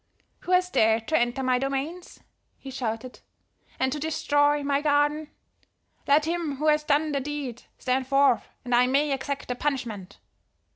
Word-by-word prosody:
"'Who 360 - -6
has 365 0 +3
dared 220 0 +2
to 315 - +1
enter 240 +3 0
my 255 -1 +2
domains?' 275 +6 -4 0.4
he 270 - -9
shouted. 240 0 -4 0.6
'And 260 0 +1
to 300 - -3
destroy 290 -1 +1
my 280 0 +1
garden? 295 +1 +1 0.8
Let 295 +2 +4
him 330 -3 -2
who 305 +3 +1
has 300 0 +3
done 300 +1 +1
the 280 - 0
deed 275 -4 -5 0.2
stand 260 0 -1
forth 275 -2 +3 0.2
that 245 - -3
I 245 +1 +5
may 280 +3 +2
exact 275 +1 -4
the 250 - -1
punishment!' 235 -8 -4
280 Hz, 160 wpm, -26 LUFS, 255-295 Hz, 0.8 s, I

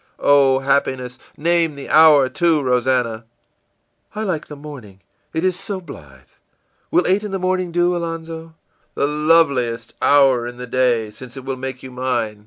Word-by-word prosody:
î - - -17
ìOh, 135 -2 +4
happiness! 130 -2 -1 0.2
Name 165 -1 +1
the 140 - -9
hour, 155 -4 +6
too, 165 0 +1
Rosannah.î 125 -3 0 1.0
ìI 220 - -2
like 170 -6 -3
the 150 - -9
morning, 135 -10 -11 0.3
it 160 +1 -3
is 185 -1 +1
so 195 -1 -5
blithe. 75 - -13 0.7
Will 180 - +2
eight 195 +3 +1
in 210 - -4
the 195 - -2
morning 185 -1 -1
do, 175 +1 +1
Alonzo?î 165 -1 -6 0.4
ìThe 150 +2 -1
loveliest 140 -8 +2
hour 135 -4 +4
in 120 0 -9
the 125 - -6
day 120 -3 0
since 125 +4 -12
it 130 - -9
will 135 0 -3
make 130 0 -7
you 130 - -9
mine. 120 -4 -2
140 Hz, 170 wpm, -19 LUFS, 125-165 Hz, 1.0 s, hour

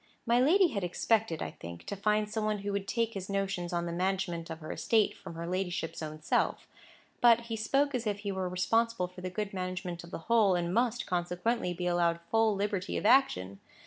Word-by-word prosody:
My 235 +1 +3
lady 345 +8 +5
had 200 -9 -3
expected, 205 +1 +1
I - - -4
think, 85 0 -10
to - - -4
find 210 +1 +1
some 215 +1 -3
one 215 0 0
who 205 - -1
would 200 -1 -2
take 230 0 0
his 195 -1 -6
notions 195 -3 -2
on 170 -1 -1
the 170 - -3
management 180 -2 -1
of 160 - -5
her 155 - -7
estate 220 -2 +2
from 165 - -10
her 165 +1 -5
ladyship's 180 -1 -2
own 155 0 -6
self; - - 0 0.5
but 235 -1 +6
he 230 -1 -5
spoke 275 +6 +1
as 240 -3 -2
if 205 -1 -2
he 200 -1 -2
were 190 -1 -2
responsible 225 +3 +1
for 180 0 -12
the 185 - -3
good 205 +2 -4
management 185 -2 -4
of 170 - -11
the - - -5
whole, 220 -5 +4
and 175 0 -1
must, 235 +1 +1
consequently, 180 +4 -1
be 180 0 -4
allowed 170 -1 +2
full 225 -2 +3
liberty 200 -1 -1
of - - -3
action. 100 - +3
195 Hz, 215 wpm, -31 LUFS, 175-225 Hz, 0.5 s, but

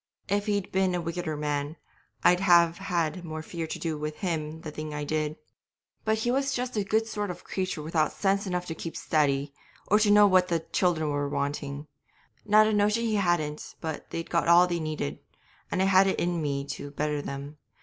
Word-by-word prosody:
If 205 +2 0
he'd 205 -2 -1
been 190 -1 +2
a - - 0
wickeder 170 -2 -3
man 145 0 -2 0.5
I'd 180 0 +5
have 170 -2 +5
had 175 -2 -1
more 155 -1 -6
fear 165 -1 -5
to - - -4
do 160 -3 -3
with 150 0 -4
him 160 -3 -3
the 155 - -6
thing 155 0 -6
I 150 - -3
did. 155 0 -1 0.7
But 220 0 +1
he 240 +2 0
was 275 +1 0
just 250 0 -3
a 210 - +1
good 220 +3 +1
sort 210 -2 -3
of 180 0 -7
creature 185 -5 -3
without 155 -1 +1
sense 195 0 0
enough 180 -1 -2
to 160 - -4
keep 165 0 -6
steady, 140 -2 +1 0.4
or 210 - +5
to 215 -1 +3
know 205 0 +7
what 185 -2 +4
the 170 -2 0
children 165 -3 0
were 145 0 -1
wanting; 140 0 -3 0.6
not 215 +1 +6
a 215 - +1
notion 210 +2 +2
he 220 -2 +1
hadn't 175 -6 -1
but 160 -2 -3
that - - -21
they'd 165 - -5
got 170 -1 +1
all 170 +1 +7
they 175 -1 -2
needed, 155 - -3 0.5
and 185 - +1
I - - +3
had 195 0 +5
it 190 - 0
in 175 -1 0
me 140 -2 -2
to 145 0 -5
better 150 0 -2
them. 140 +2 -7
170 Hz, 210 wpm, -27 LUFS, 150-195 Hz, 0.7 s, know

